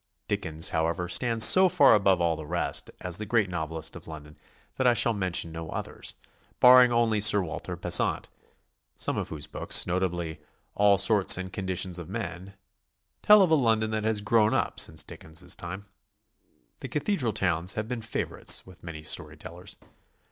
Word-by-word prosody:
Dickens, 80 0 -2
ho<wever, 85 +2 -2
stands 115 +4 +4
so 190 0 +6
far 145 -4 +4
above 95 -3 +2
all 85 -1 0
the 80 - -8
rest - - -3
as 90 0 +2
the 110 - -5
great 105 -4 0
novelist 80 -1 -4
of - - -12
Lon 80 -2 -9
don 75 +1 -17 0.4
that 130 - +1
I 120 - +3
shall 115 0 +2
mention 90 -5 -2
no 80 -1 -8
others, - - -6 0.4
barring 125 0 +7
only 115 -3 +1
Sir 105 -1 +4
Walter 80 - -7
Besant, - - +1 0.7
some - - -1
of - - -4
whose 75 -2 -6
books, - - +1
notably 85 -3 -3 0.3
"All 100 -1 +3
Sorts 100 -1 +3
and 95 0 -7
Con 95 -2 -6
ditions 95 -1 -1
of 85 -1 -10
Men," 100 -3 -7 0.7
tell 210 -1 +6
of 175 - 0
a - - +4
London 110 -5 0
that 110 -1 -3
has 110 -1 -1
grown 105 +1 +1
up - - -2
since - - +2
Dickens' 80 0 -4
time. 90 +4 -9 0.9
The - - -7
cathedral 150 - -1
towns 90 -3 -1
have 110 0 -5
been 120 -1 -5
favorites 110 - 0
with 95 -1 -17
many 80 -2 -9
story 80 0 -3
tellers. 90 +4 -11
95 Hz, 175 wpm, -26 LUFS, 85-110 Hz, 0.9 s, barring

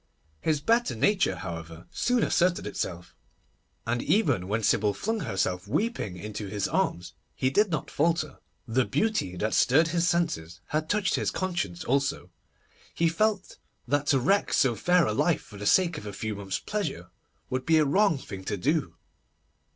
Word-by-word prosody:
His 150 - 0
better 230 - +2
nature, 190 - +2
however, 80 -2 -7
soon 245 -2 +1
asserted 175 0 +2
itself, 85 -1 -5 0.7
and 120 +1 -1
even 190 - +1
when 110 +3 -1
Sybil 105 0 +2
flung 225 +1 -2
herself 95 - -2
weeping 150 - -1
into 105 +2 -6
his 100 0 -2
arms, 85 +1 -1 0.2
he 130 - 0
did 205 +8 +3
not 155 -4 -3
falter. 160 0 0 0.3
The 125 +3 +2
beauty 215 - 0
that 110 +4 -1
stirred 160 +6 +4
his 170 +1 +1
senses 90 - -1
had 155 +1 -1
touched 205 -3 +1
his - - +1
conscience 175 - -3
also. 135 +2 -1 0.6
He 170 0 +2
felt 205 +3 -1 0.3
that 145 +3 0
to 135 - +4
wreck 195 +11 +2
so 130 -3 +3
fair 180 +7 +3
a 110 - 0
life 165 +8 +1
for 105 - -13
the 100 0 -3
sake 170 -5 +3
of 105 - -10
a 100 - -6
few 110 +3 -3
months' 100 -2 -3
pleasure 195 - -4 0.4
would 130 0 -2
be 165 -1 +5
a 155 - +4
wrong 165 +3 +3
thing 95 -7 -8
to 100 - -2
do. 150 - 0
140 Hz, 170 wpm, -27 LUFS, -, 0.7 s, be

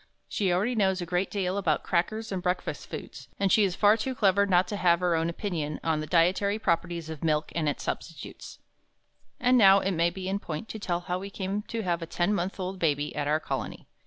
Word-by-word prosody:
She 195 -3 0
already 200 +8 +1
knows 190 -4 +2
a 175 - -3
great 180 +2 -1
deal 195 -1 -1
about 200 - 0
crackers 215 +6 -1
and 190 -2 -2
breakfast 180 +1 -2
foods, - - -8
and 195 -1 +2
she 215 - +5
is 185 -3 0
far 205 0 +5
too 255 +4 -3
clever 200 -2 +3
not 180 -1 +3
to 205 - -2
have 170 -3 +3
her 180 -1 +1
own 165 +1 0
opinion 165 -5 -3
on 160 -2 +1
the 155 - -4
dietary 185 +4 +2
properties 170 -4 -1
of 155 -1 -8
milk 155 -1 0
and 155 -3 0
its 145 - -4
substitutes. - - -6 0.8
And 250 0 +4
now 195 -2 +8
it 195 - -1
may 170 -1 +2
be 185 +1 -6
in 195 +1 -1
point 160 +2 -6
to 220 - -6
tell 175 -3 -2
how 180 +1 -3
we 195 +1 -6
came 195 +1 -3
to 230 -1 -3
have 175 -2 -1
a 165 - -5
ten 175 +5 0
months 190 +1 -2
old 185 0 -4
baby 150 -3 0
at 145 -1 -2
our 155 +1 +2
Colony. - - -5
180 Hz, 230 wpm, -28 LUFS, 170-200 Hz, 0.8 s, now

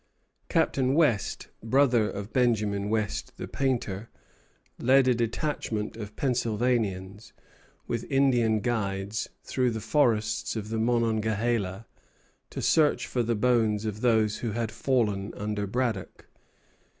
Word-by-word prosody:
Captain 130 0 +2
West, 145 -11 +1
brother 120 -2 +3
of 100 +2 -7
Benjamin 105 -5 +1
West, 110 -1 -2
the - - -5
painter, 115 -6 -2 0.7
led 130 +1 +4
a 125 - +5
detachment 115 -2 -2
of 105 -2 -8
Pennsylvanians, 115 -5 -1 0.5
with 115 0 -4
Indian 120 -6 +3
guides, 105 -2 -2 0.2
through 125 -2 0
the 110 -1 -3
forests 110 -5 +1
of 110 -1 -4
the 110 0 -2
Monongahela, 110 -3 0 0.6
to - - -5
search 155 -2 +3
for 125 - -1
the 115 0 0
bones 110 -2 +2
of 105 0 -4
those 110 -4 +2
who 115 -3 -3
had 115 -1 -2
fallen 110 -6 0
under 105 0 -3
Braddock. 115 -3 -3
115 Hz, 120 wpm, -27 LUFS, 105-125 Hz, 0.7 s, a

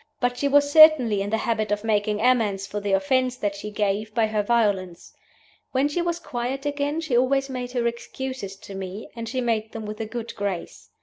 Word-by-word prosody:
But 245 -1 0
she 280 - 0
was 285 +1 +4
certainly 290 -10 +7
in 200 - -2
the 220 - +1
habit 220 -2 -1
of 205 0 -1
making 210 -1 0
amends 220 -6 +2
for 205 +1 -4
the 200 -1 -3
offense 255 +4 +2
that 205 -5 -2
she 205 +1 -6
gave 210 +1 -2
by 230 - +3
her 215 -1 0
violence. 205 -6 0 0.6
When 270 +2 +3
she 295 +4 -1
was 340 0 -1
quiet 265 -3 -4
again 290 +2 -1
she 310 -7 -1
always 270 +2 +2
made 250 -1 -5
her 240 -2 0
excuses 235 -2 -4
to 200 0 -11
me, 190 +2 -6
and 230 -1 -5
she 255 +1 -2
made 225 -2 -1
them 225 -1 -6
with 210 +1 -6
a 220 - -3
good 235 +1 -6
grace. 180 - -5
230 Hz, 210 wpm, -24 LUFS, 205-260 Hz, 0.6 s, certainly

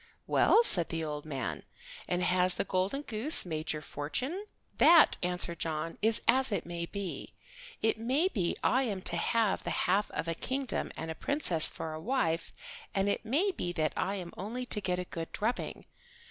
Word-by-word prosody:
"Well," 460 - +4
said 175 - +4
the 165 0 -3
old 150 -1 -5
man, 135 -5 -4 0.5
"and 180 0 -1
has 180 0 +3
the - - 0
golden 195 +9 -1
goose 245 - 0
made 155 -2 -3
your 155 -1 -4
fortune?" 260 - -4 0.3
"That," 335 -2 +7
answered 180 -1 -1
John, 160 0 -3
"is 220 +1 +4
as 260 -2 +5
it 200 - -1
may 170 0 -4
be. 200 -2 -6 0.5
It 220 0 +1
may 265 +10 +1
be 190 - -1
I 260 - +3
am 205 -8 -3
to - - 0
have 215 +4 +1
the - - -3
half 200 +3 +1
of - - -4
a 165 - 0
kingdom 260 - -3
and 160 0 -4
a - - -3
princess 180 - +4
for 160 - -6
a 155 - -6
wife, 170 -8 -1 0.4
and 195 0 +1
it - - -1
may 315 - +1
be 180 - -3
that 155 -3 0
I 195 - -1
am 180 -3 -7
only 235 +6 -5
to 215 -3 +1
get 180 -2 -1
a 180 - -4
good 165 -2 -6
drubbing. 230 +4 -3
190 Hz, 190 wpm, -30 LUFS, 165-245 Hz, 0.5 s, That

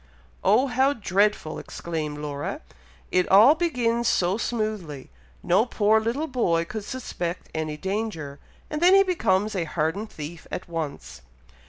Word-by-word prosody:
"Oh, 215 +7 +4
how 265 +1 +2
dreadful!" 200 - 0
exclaimed 155 -3 -5
Laura. 145 -1 -4 0.5
"It 180 -1 +2
all 215 +9 +8
begins 245 -8 0
so 180 -2 +2
smoothly! 215 - -3 0.3
No 190 +5 +4
poor 220 -1 +3
little 235 +8 -1
boy 175 - +1
could 215 +3 -6
suspect 180 -9 -5
any 155 -1 -3
danger, 190 -7 -4 0.3
and 300 +1 -4
then 365 +2 +7
he 390 - +7
becomes 215 - +1
a 175 -3 -1
hardened 165 +7 -2
thief 155 0 -8
at 185 - -5
once." 160 - -5
200 Hz, 140 wpm, -25 LUFS, 165-235 Hz, 0.5 s, all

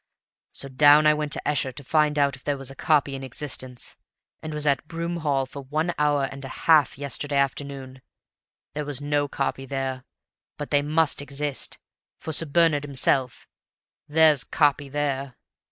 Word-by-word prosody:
So 140 - -6
down 145 +3 +6
I 150 - +6
went 150 -1 -3
to - - -4
Esher 140 -3 +1
to 140 - -9
find 150 +1 +2
out 140 -1 +2
if 135 - -18
there 145 -1 -1
was 135 -1 -4
a - - -11
copy 145 -3 +2
in 135 - -5
existence, 130 -1 -5 0.4
and 155 - -6
was 150 0 -2
at 140 0 +1
Broom 170 +1 -3
Hall 145 -4 0
for 140 +2 -9
one 155 +6 -1
hour 145 -1 +2
and 135 0 -9
a - - -5 0.2
half 155 -5 +5
yesterday 145 +1 -3
afternoon. 135 -1 -2 0.7
There 150 - -3
was 145 -3 -2
no 145 0 0
copy 135 -1 -3
there, 130 -1 -3 0.5
but 145 - -6
they 145 -1 +4
must 155 0 +1
exist, 145 0 -4 0.4
for 160 - -5
Sir 165 - 0
Bernard 155 -1 +3
himself 130 -2 0 0.6
(there's 155 -3 +5
'copy' 145 -2 +1
THERE!) 140 -2 -2
145 Hz, 170 wpm, -25 LUFS, 135-150 Hz, 0.7 s, down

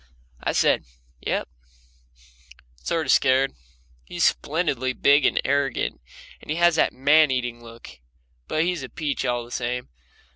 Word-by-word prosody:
I - - -1
said, - - +2 0.4
"Yep," - - -1 1.3
sort 160 - -2
of 130 - +2
scared. 135 0 +3 0.5
He's 60 - -3
splendidly 140 -5 0
big 140 +1 +4
and - - 0
arrogant, 140 -2 -1 0.4
and - - -16
has 170 +2 +3
that - - +3
man 145 +3 +4
eating 120 -2 -3
look, 115 - -13 0.5
but 155 - 0
he's 175 -2 -1
a 130 - -7
peach 150 -3 -3
all 120 -1 -1
the 120 - -16
same. 125 0 -3
135 Hz, 140 wpm, -24 LUFS, 125-155 Hz, 1.3 s, big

